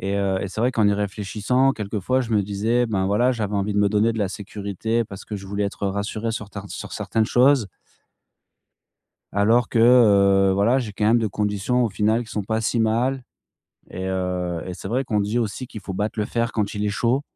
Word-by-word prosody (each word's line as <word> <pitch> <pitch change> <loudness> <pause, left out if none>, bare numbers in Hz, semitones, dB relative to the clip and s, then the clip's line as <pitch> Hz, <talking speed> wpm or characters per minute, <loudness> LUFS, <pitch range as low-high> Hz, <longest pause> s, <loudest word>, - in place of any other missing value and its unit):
et 100 +1 -2
heu, 100 -1 0
c'est 100 +3 -5
vrai 125 +2 +2
qu'en 110 -4 +3
y - - +3
réfléchissant 105 +6 0
quelquefois, 105 +4 -1
je 120 - -7
me 105 - +4
disais: 110 +5 0
«Ben, 100 -4 -1
voilà, 105 +6 +2
j'avais 105 -5 -2
envie 100 +1 -1
de 105 - +1
me 100 -1 +3
donner 110 +2 +2
de - - -4
la 100 -3 0
sécurité 105 +3 -3
parce 100 -2 -11
que 105 - -5
je 100 -1 -9
voulais 100 +1 -2
être 100 0 -3
rassuré 105 +3 -3
sur 105 -2 -5
tin 100 -1 -8
sur - - -7
certaines 110 -1 -1
choses.» 130 -1 +4 1.7
Alors 110 +4 +3
que, 115 - +1
heu, 100 -5 +5
voilà, 105 +6 +3
j'ai 115 -5 -4
quand 105 +1 -2
même 115 +3 +5
des 110 -2 0
conditions 105 +5 0
au - - -1
final 110 +4 +1
qui - - -15
sont 105 - -3
pas 110 +3 -1
si 115 +2 0
mal 120 +4 0 0.7
et 95 +1 -5
heu 90 -2 -2
et 90 - -5
c'est - - -9
vrai 120 +7 0
qu'on 110 -5 -1
dit 105 +4 -1
aussi 115 +3 -3
qu'il 110 - -9
faut 95 -1 -6
battre 105 +4 -3
le 105 - 0
fer 115 0 -1
quand 105 -2 -1
il 105 0 -2
est - - +1
chaud. 120 +6 0
105 Hz, 225 wpm, -23 LUFS, 100-115 Hz, 1.7 s, heu